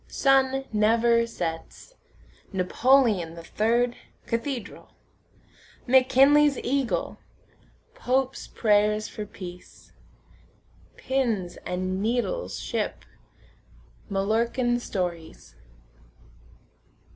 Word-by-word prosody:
Sun 270 0 +2
never 230 +2 +3
sets. 165 - -6 0.6
Napoleon 195 -2 +2
the 170 - -10
third, 235 +6 0 0.3
cathedral. 235 +1 -5 0.9
McKinley's 270 +3 +5
eagle. 270 -1 -1 0.7
Pope's 265 - -1
prayers 210 -1 +1
for 210 -1 -7
peace. 180 -3 -11 1.1
Pins 225 -10 -1
and 185 +1 -2
needles 245 - -2
ship. - - -3 1.0
Mallorcan 230 +5 0
stories. 175 - -5
230 Hz, 65 wpm, -25 LUFS, 195-260 Hz, 1.1 s, McKinley's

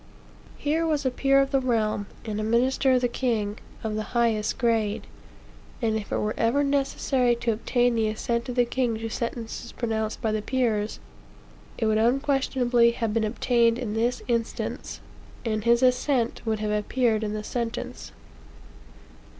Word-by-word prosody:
Here 310 +3 0
was 295 -3 0
a 260 - +2
peer 275 +2 +3
of 275 0 +1
the 270 - +3
realm, 220 -5 0 0.2
and 215 -2 -3
a - - -1
minister 255 +4 +2
of 250 - +3
the 245 - +3
king, 225 -4 -1 0.2
of 220 -1 -2
the 215 - -1 0.2
highest 225 -3 +1
grade; 225 -4 0 0.7
and 225 -3 0
if 215 -2 -4
it - - +1
were 210 +1 -1
ever 245 +6 +2
necessary 270 -3 +1
to 235 0 -1
obtain 245 +2 +1
the 225 -2 +1
assent 235 +3 -2
of 245 - -3
the 245 -1 +4
king 240 -2 0
to 225 0 -4
sentences 235 0 -4
pronounced 220 -2 -2
by 220 -3 0
the 215 0 -1
peers, 220 -4 0 0.8
it 225 - 0
would 215 0 +2
unquestionably 250 -1 +2
have 225 -2 -2
been 225 0 +1
obtained 230 +1 +2
in 240 -4 -3
this 235 +3 0
instance, 235 -2 -3 0.4
and 215 -1 -1
his 235 +2 +4
assent 250 -1 +2
would 220 -1 +1
have 210 0 -2
appeared 220 +1 +1
in 210 -1 -2
the 215 0 -4
sentence. 235 0 -4
235 Hz, 165 wpm, -26 LUFS, 220-250 Hz, 0.8 s, the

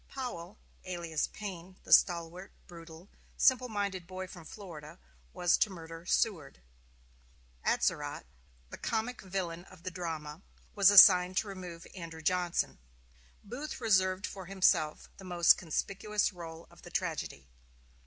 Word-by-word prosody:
Powell, 220 -8 -6 0.3
alias 170 -4 -2
Payne, 185 -3 -8
the - - +1
stalwart, 175 +1 +3
brutal, 165 +1 -12 0.3
simple 255 -1 +4
minded 200 -4 -3
boy 185 0 -6
from 175 -3 -12
Florida, 160 -6 -10 0.3
was 175 -1 +2
to - - +2
murder 165 -2 -10
Seward; 165 - 0 1.0
Atzerodt, - - 0 0.5
the - - -8
comic 230 +2 -2
villain 180 -3 -4
of 185 -3 -17
the 185 - -4
drama, 165 -3 -5 0.3
was 200 -2 +6
assigned 185 -2 +8
to 220 - +1
remove 180 -3 -8
Andrew 165 -3 -9
Johnson; 180 - 0 0.6
Booth 250 +9 -6
reserved 190 -4 +2
for 190 -3 -8
himself 180 -5 +2
the 195 - -12
most 175 -3 +5
conspicuous 200 +5 -1
rôle 165 -2 -9
of - - -18
the - - -11
tragedy. 70 -1 -3
180 Hz, 130 wpm, -31 LUFS, 165-195 Hz, 1.0 s, assigned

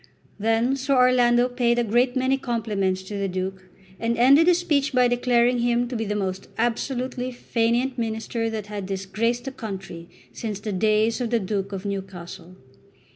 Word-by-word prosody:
Then 225 +5 +2
Sir 275 +1 0
Orlando 250 -1 +4
paid 245 -1 +1
a 240 - +2
great 240 +3 +2
many 260 +1 +2
compliments 210 -7 -1
to 200 +1 -6
the 200 - 0
Duke, 185 0 -5 0.3
and 230 +1 -1
ended 275 +7 +6
his 355 -1 +5
speech 295 -5 0
by 250 -1 +4
declaring 245 0 +2
him 240 0 +1
to 250 - -4
be 225 -1 -2
the 210 0 -2
most 190 -2 -3
absolutely 250 +2 -2
fainéant 240 +1 0
minister 225 0 -2
that 220 -2 -4
had 205 -2 -6
disgraced 210 +5 -1
the 270 - -4
country 195 -8 -7 0.2
since 210 - -4
the 210 0 -4
days 215 +4 +2
of 240 - -1
the 235 0 +2
Duke 195 0 -3
of 195 0 -6
Newcastle. 190 -3 -6
230 Hz, 175 wpm, -24 LUFS, 200-245 Hz, 0.3 s, ended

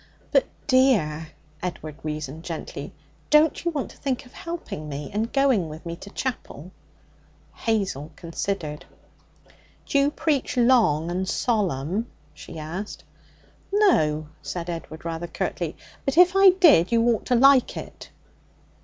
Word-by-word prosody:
'But, - - +3 0.2
dear,' 215 - +3 0.3
Edward 160 -4 -5
reasoned 155 0 -5
gently, 165 -3 -6 0.4
'don't 300 +1 +4
you 340 - +1
want 295 -5 -3
to - - -17
think 265 -3 -2
of 245 - -18
helping 335 - -6
me, 145 0 -6
and 220 +3 -1
going 260 - +2
with 155 +3 -10
me 170 0 -4
to 200 - -11
chapel?' 195 - -5 0.8
Hazel 195 - -2
considered. 165 -3 -4 1.0
'D'you 280 0 +3
preach 290 -4 -1
long 225 - +4
and 185 +1 -2
solemn?' 200 - 0 0.3
she 165 - -10
asked. 170 +7 -6 0.7
'No,' 155 - +3
said 170 +4 -4
Edward 165 -1 -8
rather 165 +1 -4
curtly. 170 - -3 0.3
'But 275 +3 -2
if 360 +1 +7
I 390 0 +8
did, 335 - +5
you 230 0 +3
ought 230 - 0
to 250 - +3
like 270 +1 +5
it.' - - -9
195 Hz, 135 wpm, -24 LUFS, 160-265 Hz, 1.0 s, I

